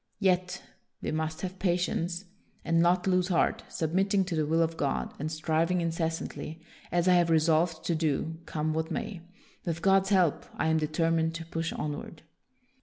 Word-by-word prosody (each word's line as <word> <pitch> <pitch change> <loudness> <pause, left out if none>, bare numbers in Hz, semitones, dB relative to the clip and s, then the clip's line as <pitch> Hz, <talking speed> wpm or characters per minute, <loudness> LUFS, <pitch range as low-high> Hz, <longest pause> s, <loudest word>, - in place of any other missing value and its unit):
Yet, 180 -2 +1 0.2
" - - -48
we - - -1
must 155 0 -2
have 185 0 -5
patience 175 0 0 0.4
and 165 0 +2
not 175 +1 +3
lose 185 -1 +2
heart, 175 -3 +2
submitting 190 +4 +1
to 180 -2 -3
the 155 -1 0
will 165 +2 +3
of 165 0 -2
God, 140 -4 -1
and 155 +2 -3
striving 160 +3 +1
incessantly, 165 -1 -3 0.3
as 175 0 +2
I 180 - +6
have 175 -1 +4
resolved 160 +1 +2
to 170 - +1
do, 160 0 -1
come 155 0 -1
what 160 +1 -1
may. 185 +2 -4 0.4
With 170 -1 -3
God's 195 0 +4
help, 185 -6 +2
I 160 - 0
am 160 0 +3
determined 165 +1 +1
to 165 -1 -5
push 165 0 -3
onward." 150 +1 -5
165 Hz, 175 wpm, -29 LUFS, 160-180 Hz, 0.4 s, I